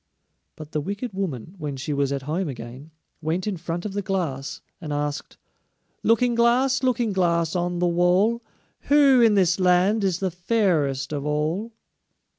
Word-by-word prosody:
But 155 -1 -10
the 150 - -1
wicked 205 - -5
woman, 170 - -4
when 145 -3 -4
she 145 +3 -3
was 140 -1 0
at 140 -1 -3
home 160 +5 -2
again, 125 +3 -9 0.3
went 165 +4 -1
in 210 -2 -2
front 175 +1 -5
of 205 - -4
the 205 - -2
Glass 170 -9 -3 0.2
and 155 - -6
asked: 145 0 -3 0.6
"Looking 240 +2 +3
glass, 245 +3 +3
Looking 240 -4 +1
glass, 170 -3 +1
on 175 0 -1
the 180 - +1
wall, 180 +7 +2 0.5
Who 280 -3 +6
in 225 -3 +5
this 180 -1 +3
land 185 +4 +3
is 185 -3 +1
the 190 -1 -2
fairest 165 - 0
of 145 -1 -3
all?" 155 +10 -2
180 Hz, 165 wpm, -24 LUFS, 150-205 Hz, 0.6 s, Who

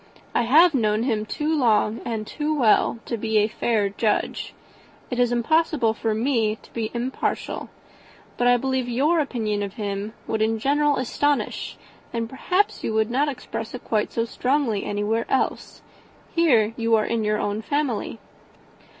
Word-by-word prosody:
I 240 - +2
have 325 +5 +7
known 215 -3 +1
him 220 -4 -1
too 305 +6 -1
long 225 -5 +2
and 220 -2 -3
too 300 +6 -3
well 230 -2 +3
to 235 - -3
be 220 0 0
a 210 0 +4
fair 220 -1 0
judge. 205 +2 -1 0.6
It 245 - -2
is 245 -1 +3
impossible 245 -1 +2
for 220 -1 -1
me 225 -2 +1
to - - -19
be 225 -2 -2
impartial. 250 +3 -3 0.7
But 245 - +1
I 245 0 +6
believe 260 0 -1
your 295 +8 +2
opinion 225 -8 -1
of 200 -1 -4
him 205 -1 -4
would 220 -1 -2
in 220 +1 +2
general 290 +4 +2
astonish 285 +3 -1 0.3
and, 230 -1 -2
perhaps, 360 - 0
you 220 - -1
would 220 +1 +1
not 285 +4 +2
express 250 -3 -6
it 250 - -8
quite 215 -2 0
so 230 - 0
strongly 250 -3 0
anywhere 210 +3 -1
else. 265 - -1 0.5
Here 240 -11 +3
you 230 -1 +2
are 215 - +2
in 230 -1 -1
your 210 0 +1
own 205 +1 -2
family." 275 -4 -2
230 Hz, 165 wpm, -24 LUFS, 215-265 Hz, 0.7 s, have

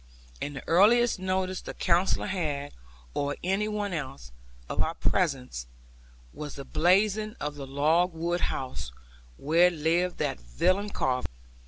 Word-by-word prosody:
And 145 0 -3
the - - -8
earliest 220 +6 +5
notice 185 0 -1
the - - -7
Counsellor 175 +2 +2
had, 150 -7 -2 0.4
or 145 0 -1
any 195 +4 +1
one 210 -2 -2
else, 130 - -5 0.4
of - - 0
our 165 - -1
presence, 130 - -1 0.7
was 150 -2 -7
the 140 - -7
blazing 205 +8 +2
of 150 0 -3
the 140 -2 -8
log 155 +6 +2
wood 170 +1 -2
house, 130 - -3 0.5
where 165 +5 +4
lived 170 +2 0
that - - -1
villain 185 - +1
Carver. 130 -9 0
170 Hz, 140 wpm, -28 LUFS, 140-185 Hz, 0.7 s, earliest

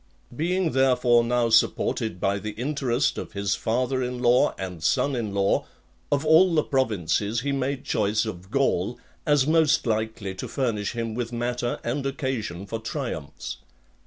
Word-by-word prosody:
XXII. - - -15
Being, 175 +1 +1
therefore, 125 -3 +4
now 120 0 +1
supported 110 -3 +2
by 100 +2 0
the 105 +1 -5
interest 130 +1 0
of - - -7
his 100 -1 0
father 125 +3 0
in 125 0 -2
law 125 0 +3
and 90 -4 -6
son 140 - +2
in 115 -4 -2
law, 100 0 +1 0.4
of 145 +1 +1
all 165 +3 +6
the 155 - +3
provinces 110 - 0
he 140 +2 -1
made 135 0 -2
choice 110 -2 +1
of 95 -3 -7
Gaul, 120 -5 +1 0.3
as 145 -3 +4
most 155 -1 +3
likely 110 -3 -2
to 95 - -6
furnish 115 -7 -1
him 115 -2 -3
with 120 0 -3
matter 120 0 -2
and 130 +4 -2
occasion 125 -10 -3
for 115 +3 -4
triumphs. 110 - -5
120 Hz, 160 wpm, -25 LUFS, 105-135 Hz, 0.4 s, all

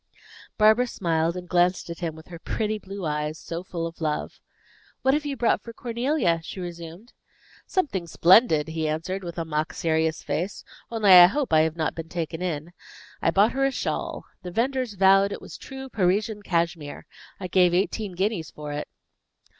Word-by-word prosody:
Barbara 220 +3 +5
smiled 165 -4 0
and 180 0 -7
glanced 180 +1 +2
at 170 - -7
him 165 -3 -3
with 160 +1 -14
her 170 -2 -9
pretty 215 +3 -2
blue 195 -2 -7
eyes, 150 0 -2
so 165 +2 -6
full 170 -3 -4
of 165 0 -8
love. 155 -2 -2 0.6
"What 265 - +4
have 295 0 0
you 275 -2 -3
brought 235 0 +2
for 230 - -10
Cornelia?" 235 - 0
she 165 - -8
resumed. 175 +4 -8 0.5
"Something 255 - -1
splendid," 165 -2 +5
he 160 -1 -2
answered, 175 +5 -3
with 170 -1 -7
a 165 - -2
mock 155 0 -2
serious 160 -1 0
face; 175 +7 -3 0.3
"only 220 -4 +3
I 180 -1 +11
hope 260 - -2
I 155 - +7
have 160 0 0
not 160 -2 -1
been 165 -1 -7
taken 165 -1 -4
in. 170 -1 -3 0.5
I - - +3
bought 200 +6 +4
her 270 +1 -1
a 270 - +4
shawl. 270 - -3 0.2
The 180 - -6
venders 250 +2 -1
vowed 195 +1 +5
it - - -5
was - - -11
true 265 0 -8
Parisian 210 0 0
cashmere. 170 -5 -2 0.3
I 190 - -5
gave 180 0 +4
eighteen 200 +1 -1
guineas 190 -4 -1
for 150 -1 -7
it." 145 - -4
180 Hz, 185 wpm, -25 LUFS, 165-215 Hz, 0.6 s, I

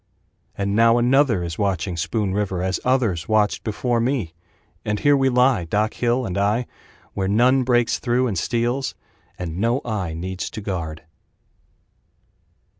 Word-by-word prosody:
And 100 0 -1
now 115 +1 +5
another 120 -5 +3
is 85 -2 -5
watching 95 -2 -1
Spoon 95 +4 -1
River 95 -3 -1
As 95 0 -1
others 115 -10 0
watched 105 -1 +2
before 120 +2 -1
me. 115 - -1 0.5
And 105 -1 -1
here 145 0 +4
we 135 -1 +2
lie, 125 -6 +3
Doc 105 +6 0
Hill 120 +1 0
and 95 -2 -2
I 105 +5 +1 0.5
Where 95 -1 -1
none 125 +6 +4
breaks 120 -2 +2
through 125 0 +1
and 110 -6 -1
steals, 120 +8 -1 0.4
And 85 -1 -5
no 115 +5 +1
eye 100 -8 -3
needs 95 +2 -4
to 110 - -7
guard. 85 -6 -4
110 Hz, 150 wpm, -22 LUFS, 95-125 Hz, 0.5 s, now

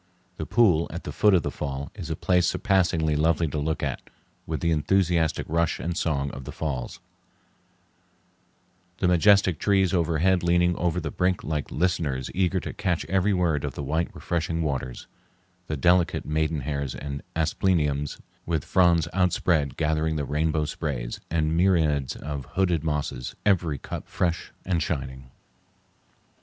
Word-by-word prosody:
The - - -4
pool 90 -9 +4
at - - -6
the - - -5
foot 105 -2 +4
of 90 - +2
the - - -2
fall 70 -1 -5
is 90 -6 -7
a 80 - -1
place 85 +1 +2
surpassingly 85 -5 +1
lovely 80 +2 +2
to 75 - -3
look 80 +2 -2
at, - - -2 0.5
with 80 -1 -2
the 85 - +1
enthusiastic 85 0 +1
rush 85 0 0
and 85 +1 -3
song 70 -5 -1
of 65 0 -8
the - - -6
falls, 65 -6 -4 2.0
the 90 - +1
majestic 90 -1 +4
trees 95 -3 +2
overhead 85 +1 +2
leaning 85 0 +3
over 90 0 0
the 80 -4 -4
brink 90 0 0
like 75 -2 -3
listeners 75 -7 -1
eager 95 0 +1
to - - -6
catch 90 -7 -1
every 95 +4 +1
word 85 -6 +1
of 70 -3 -4
the 75 - -4
white 80 +5 -1
refreshing 85 -1 -2
waters, 65 -4 -3 0.6
the 75 - -2
delicate 90 +4 +2
maidenhairs 75 -3 -1
and 70 -1 -5
aspleniums 80 -3 0 0.2
with 80 -4 -2
fronds 85 -4 +3
outspread 85 -6 +1
gathering 80 0 0
the 75 -2 -1
rainbow 75 +1 0
sprays, 70 -6 -4
and 80 -1 +1
the - - 0
myriads 80 -6 +2
of 70 -2 -5
hooded 90 -5 +1
mosses, 75 -5 -3
every 85 -7 +2
cup - - -7
fresh 85 -2 -2
and 90 -3 0
shining. 65 -4 -4
80 Hz, 155 wpm, -26 LUFS, 75-90 Hz, 2.0 s, pool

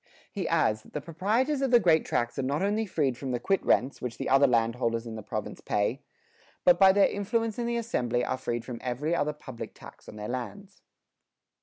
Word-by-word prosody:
He 190 -5 -3
adds 150 -10 +2
that - - -19
"the 150 - -2
proprietors 220 - 0
of 270 - +1
the 240 -1 +6
great 165 -6 +3
tracts 120 +2 -1
are - - +2
not 140 +6 -1
only 210 +2 0
freed 140 -9 0
from 135 - -4
the 120 - -1
quit 195 +8 0
rents, 130 +3 +1
which 125 -2 -5
the - - -3
other 135 +1 +6
landholders 115 -1 +1
in 115 - -6
the 110 - -6
province - - -5
pay, 105 +6 -1 0.6
but 175 -1 +6
by 190 -1 +8
their 200 +1 +5
influence 225 +2 -2
in 235 - -1
the 235 0 0
assembly 125 - -1
are 130 - -2
freed 120 -2 -3
from 120 -2 -6
every 130 +6 -2
other 150 -3 +1
public 130 -5 -9
tax - - -13
on - - -10
their 105 0 -6
lands." 190 +11 -6
145 Hz, 215 wpm, -28 LUFS, 120-200 Hz, 0.6 s, by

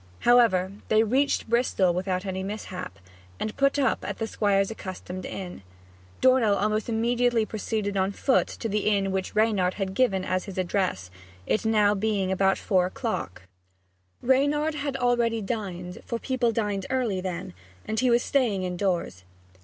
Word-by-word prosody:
However, 225 -7 +4 0.2
they 220 0 +4
reached 265 +6 +1
Bristol 225 -6 +2
without 185 +1 -2
any 190 -1 -3
mishap, 190 -2 -6 0.4
and 215 - -3
put 275 +1 +2
up 275 -2 +1
at - - -4
the 225 - -2
Squire's 200 -2 +1
accustomed 185 -3 -7
inn. 180 - -7 0.6
Dornell 255 -5 +4
almost 215 +2 0
immediately 235 0 +2
proceeded 215 -1 -3
on 190 0 +1
foot 260 +6 +2
to 230 - -5
the 210 -1 -1
inn 200 -2 +1
which 190 +1 -3
Reynard 210 -4 +2
had 195 -2 -3
given 195 -5 +1
as 185 0 -1
his 195 -3 -8
address, 185 - -1 0.3
it - - +1 0.4
being 205 -2 0
now - - +1
about 195 0 +2
four 185 -2 +2
o'clock. 185 - -4 0.8
Reynard 285 +4 +2
had 285 -2 -3
already 240 -2 +1
dined 190 -5 -5
for 235 - -3
people 245 -1 0
dined 205 -4 -2
early 240 -8 0
then 185 0 -5 0.3
and 220 0 -1
he 255 +1 +3
was 240 0 +3
staying 230 -9 +1
indoors. 180 - -2
210 Hz, 155 wpm, -26 LUFS, 190-235 Hz, 0.8 s, However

